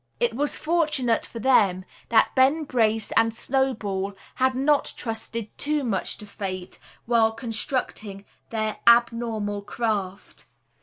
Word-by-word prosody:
It 240 - +1
was 290 +5 0
fortunate 305 -8 +1
for - - -10
them 205 -7 +3 0.2
that 230 - +4
Ben 275 +4 +3
Brace 225 -5 0
and 225 0 +3
Snowball 215 -6 -1 0.2
had 260 0 +1
not 285 +2 +2
trusted 225 -1 -4
too 300 0 +1
much 215 -7 -2
to 210 - -10
fate 190 -3 -6 0.3
while 230 -2 +3
constructing 225 -3 -4 0.2
their 215 -1 -2
abnormal 230 -3 +3
craft. 205 -2 -4
230 Hz, 120 wpm, -25 LUFS, 210-260 Hz, 0.3 s, that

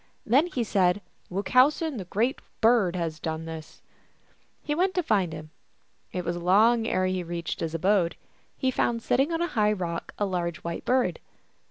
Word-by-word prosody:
Then 270 +9 +4
he 255 -9 -2
said, 185 -3 +2 0.2
" - - -38
Wuchowsen, 255 - +2
the 190 - -6
Great 230 +9 0 0.2
Bird, 220 -6 +4
has 165 -3 -3
done 160 +1 -4
this! 160 -1 -9 0.4
" - - -38
He 295 - -1
went 370 +4 +1
to 360 - +1
find 195 - +1
him; 155 0 -8 0.6
it 180 -1 -4
was 170 0 -1
long 220 +6 +4
ere 185 -3 +1
he 185 0 0
reached 170 -1 -4
his 165 0 -3
abode. 185 0 +2 0.4
He 260 -2 +1
found 230 -2 0
sitting 270 +6 +2
on 330 +1 0
a - - 0
high 210 -2 +3
rock 170 -4 -4
a 205 - +1
large 175 -4 -2
white 170 0 -5
Bird. 245 -10 +1
190 Hz, 185 wpm, -27 LUFS, 170-245 Hz, 0.6 s, Then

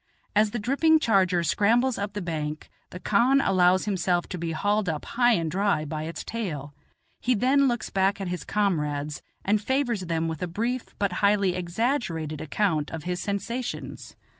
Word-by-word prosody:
As 210 +1 +4
the 240 - -4
dripping 280 +8 +3
charger 190 - +2
scrambles 230 - +2
up 200 0 -3
the 205 -2 -4
bank, 155 -3 -4 0.2
the 180 - -8
khan 235 +9 +3
allows 185 -5 +3
himself 180 -3 0
to 180 - -5
be 165 0 -2
hauled 205 +4 0
up 155 -2 -3
high 240 0 +3
and 165 -6 0
dry 190 -4 +1
by 155 +1 -4
its 165 - -6
tail; 155 -11 -5 0.5
he 250 0 +1
then 270 +5 +3
looks 240 -3 -2
back 195 +1 +1
at 195 - -3
his 180 0 -4
comrades 150 -7 -1 0.2
and 205 +1 +2
favors 245 -3 0
them 165 -2 -1
with 160 -2 -4
a 180 - -1
brief 230 +8 -3
but 200 -2 0
highly 200 -2 +3
exaggerated 175 - -2
account 160 -2 0
of 160 -2 -6
his 180 0 -3
sensations. 230 +5 -4
195 Hz, 175 wpm, -26 LUFS, 165-225 Hz, 0.5 s, As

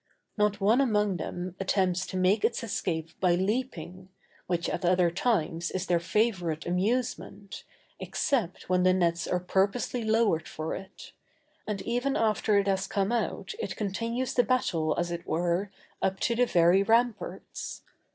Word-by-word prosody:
Not 210 -1 +1
one 215 +6 +4
among 210 -7 +2
them 175 +2 -5
attempts 190 -1 +1
to 185 - -4
make 185 +3 +3
its 235 - +1
escape 165 -7 -2
by 180 -2 +3
leaping, 190 -3 -3 0.4
which 175 -1 -1
at - - -3
other 180 -1 +3
times 170 -5 0
is 185 -1 -3
their 175 -1 +2
favorite 175 -4 0
amusement, 200 +1 -2 0.4
except 235 - -1
when 180 0 +2
the 185 0 +4
nets 170 -2 +1
are 180 - 0
purposely 195 +7 0
lowered 220 -7 +2
for 155 +1 -4
it; 195 0 -9 0.6
and 210 -2 -3
even 245 +4 0
after 215 -1 +2
it 200 - +2
has 195 -1 0
come 200 +1 0
out 205 -4 -2
it 190 - -3
continues 230 +5 -2
the 245 - +5
battle, 165 -11 +1
as 175 0 -1
it 170 0 -5
were, 175 +4 0 0.3
up 190 0 0
to 235 - +1
the 245 +1 +3
very 175 +1 +4
ramparts. 230 +2 -1
190 Hz, 155 wpm, -28 LUFS, 175-220 Hz, 0.6 s, the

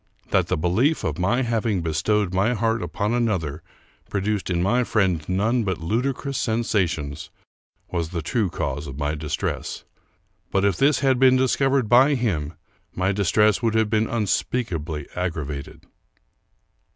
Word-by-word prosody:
That - - +3
the - - 0
belief 110 - +1
of 80 +2 -2
my 120 +8 +1
having 115 -5 0
bestowed 95 +5 0
my 100 +6 +2
heart 115 +1 0
upon 105 +1 -2
another 95 -11 -1 0.5
produced 100 0 -1
in 85 -2 0
my 120 +6 +2
friend 95 -9 +1
none 110 +6 +1
but 95 -4 -1
ludicrous 125 - -2
sen 115 0 0
sations 80 -10 -1 0.6
was 85 -3 -2
the 85 -2 -4
true 105 +3 0
cause 70 -1 -3
of 65 0 -8
my 75 0 -1
distress; 75 -1 -3 0.7
but 95 0 +1
if 100 -3 +2
this 145 +1 +3
had 130 -2 +2
been 130 -1 +6
discovered 130 -1 +2
by 130 +6 +5
him 85 - -2 0.4
my 95 +2 +1
distress 105 +2 +2
would 115 -2 +1
have 110 -1 +2
been 110 0 +1
un 115 -3 0
speakably 85 - -2
aggravated. 75 -6 -4
100 Hz, 150 wpm, -23 LUFS, 85-120 Hz, 0.7 s, been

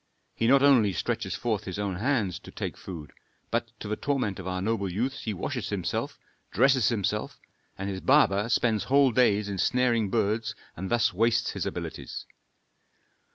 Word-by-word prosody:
He 115 - 0
not 135 +2 +5
only 120 -9 +5
stretches - - -2
forth 110 -3 -2
his 95 -1 -5
own 100 -3 -2
hands 110 -5 0
to - - -13
take - - -5
food, 80 -7 -9 0.4
but, - - 0
to - - -6
the 105 - -1
torment 125 -8 -1
of 95 - -6
our 95 0 -2
noble 100 -1 -1
youths, 125 +9 -2
he 110 - -1
washes 100 - -3
himself, - - -2 0.3
dresses 130 +1 +4
himself, 105 -2 -2 0.4
and 95 - -4
his 95 -1 -4
barber 115 -7 +4
spends 115 -3 +2
whole 140 0 +4
days 105 -4 +3
in 100 -2 -4
snaring 120 -3 +2
birds 110 +1 0 0.2
and 95 +3 -5
thus 120 -5 +2
wastes 115 +4 +2
his - - -3
abilities. - - -6
110 Hz, 170 wpm, -27 LUFS, 100-125 Hz, 0.4 s, not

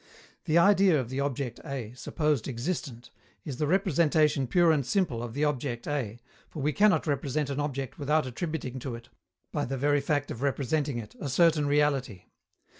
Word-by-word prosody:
The 160 - +2
idea 190 -3 +5
of 125 -2 -4
the 130 - -2
object 140 -3 -2
A, 125 -5 -5
supposed 150 0 -1
existent, 125 -2 -4 0.3
is 140 -6 -5
the 150 - 0
representation 155 - +2
pure 170 +5 +4
and 150 -3 +2
simple 145 - 0
of 120 0 -6
the 145 - 0
object 130 -4 -2
A, 120 -6 -3 0.3
for - - -8
we 150 +1 +1
cannot 210 +3 +4
represent 145 0 -1
an 140 - -3
object 135 -3 -3
without 150 +1 +1
attributing 130 0 -4
to 125 -1 -5
it, 115 +1 -12 0.4
by - - -1
the 135 +1 -3
very 145 +2 +2
fact 145 0 -1
of 120 - -6
representing 140 0 0
it, 110 -3 -8
a 145 - -4
certain 155 +2 +3
reality. 140 -9 +1
145 Hz, 180 wpm, -28 LUFS, 125-155 Hz, 0.4 s, idea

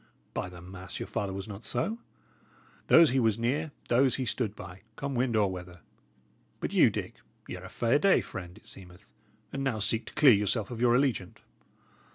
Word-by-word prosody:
By 90 - -3
the 85 -1 -11
mass, 90 0 -8
your - - -3
father 100 -1 -3
was 95 +2 -5
not 105 +1 -8
so! 130 - -1 0.9
Those 165 -4 +7
he 130 - +2
was 110 -3 +2
near, 140 +7 -1 0.2
those 130 +2 +3
he 130 - -2
stood 115 -4 -1
by, 90 -1 -10
come 140 +1 -4
wind 125 -1 0
or 105 -3 +3
weather. 90 -1 -9 0.8
But - - -3
you, - - +6
Dick, - - -5 0.3
y' - - -5
are - - -11
a - - -8
fair 120 +5 +2
day 195 +2 +5
friend, 90 -1 -7
it - - -19
seemeth, 90 +1 -11 0.5
and 135 - -2
now 135 -5 0
seek 110 +2 -1
to - - -9
clear 140 -5 +7
yourself 105 +1 0
of 120 -1 -5
your 120 -1 +5
allegiance." 125 -9 0
110 Hz, 200 wpm, -29 LUFS, 95-130 Hz, 0.9 s, Those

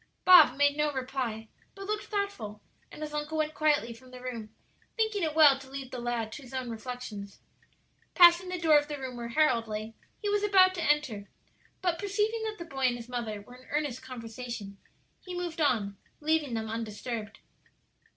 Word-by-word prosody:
'" - - -46
Bob 360 -8 +8
made 285 0 +4
no 300 0 +1
reply, 255 -4 -3 0.3
but 395 0 -8
looked 420 +1 -2
thoughtful, 400 - -3 0.3
and 305 - -8
his 300 0 -6
uncle 300 +1 -3
went 310 0 0
quietly 295 -7 +2
from 255 +3 -16
the 255 0 -10
room, 240 -4 -6 0.5
thinking 440 -2 +1
it 315 -2 -1
well 290 -4 +7
to 270 -1 -13
leave 270 -1 -7
the 255 - -5
lad 240 -2 -2
to 290 - -8
his 265 0 -10
own 255 -2 -3
reflections. 220 -4 -7 0.8
Passing 350 0 +7
the 365 - -2
door 320 -3 +5
of 290 - -6
the 295 -1 -4
room 260 -2 -6
where 235 -1 -5
Harold 235 -3 +2
lay, 215 +1 -5 0.3
he 415 - -3
was 410 0 +2
about 380 -3 +5
to 340 -3 -3
enter, 245 -10 0 0.5
but 350 -2 +1
perceiving 420 +3 0
that 430 -1 -4
the 340 - -7
boy 270 -5 0
and 245 - +1
his 235 0 -10
mother 225 -4 -4
were 245 - -14
in 255 +1 -15
earnest 290 -4 -2
conversation, 235 -5 -7 0.4
he 360 -1 -6
moved 345 -2 -3
on, 215 -9 +1 0.2
leaving 300 -4 +1
them 220 0 -2
undisturbed. 220 -1 -5
265 Hz, 195 wpm, -29 LUFS, 235-320 Hz, 0.8 s, Bob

